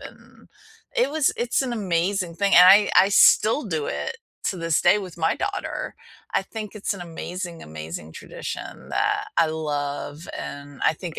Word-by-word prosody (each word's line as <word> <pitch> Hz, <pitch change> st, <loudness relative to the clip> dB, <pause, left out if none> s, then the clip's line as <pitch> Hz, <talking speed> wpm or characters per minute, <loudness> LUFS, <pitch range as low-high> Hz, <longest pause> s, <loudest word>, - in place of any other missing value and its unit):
and -, -, -14 dB, 0.5 s
it -, -, +2 dB
was 310 Hz, -2 st, +2 dB
it's 240 Hz, +2 st, 0 dB
an 255 Hz, -2 st, -3 dB
amazing 185 Hz, -3 st, -1 dB
thing 200 Hz, +3 st, +2 dB
and 180 Hz, +1 st, +10 dB
I 205 Hz, +2 st, +7 dB
I 195 Hz, -, +7 dB
still 225 Hz, +6 st, +5 dB
do 160 Hz, -7 st, -2 dB
it 75 Hz, 0 st, -3 dB, 0.3 s
to -, -, -1 dB
this 165 Hz, -2 st, +1 dB
day 210 Hz, -, +5 dB
with 185 Hz, -4 st, -8 dB
my 160 Hz, 0 st, +2 dB
daughter. 400 Hz, +1 st, -4 dB, 0.4 s
I -, -, +2 dB
think 215 Hz, -2 st, -7 dB
it's 210 Hz, -1 st, -2 dB
an 195 Hz, -, -9 dB
amazing, 175 Hz, 0 st, -6 dB
amazing 80 Hz, 0 st, -8 dB
tradition -, -, -8 dB
that -, -, 0 dB
I 165 Hz, -, +5 dB
love 150 Hz, 0 st, -4 dB
and 145 Hz, -1 st, -8 dB
I -, -, +4 dB
think 165 Hz, +1 st, -7 dB
175 Hz, 170 wpm, -24 LUFS, 155-205 Hz, 0.5 s, and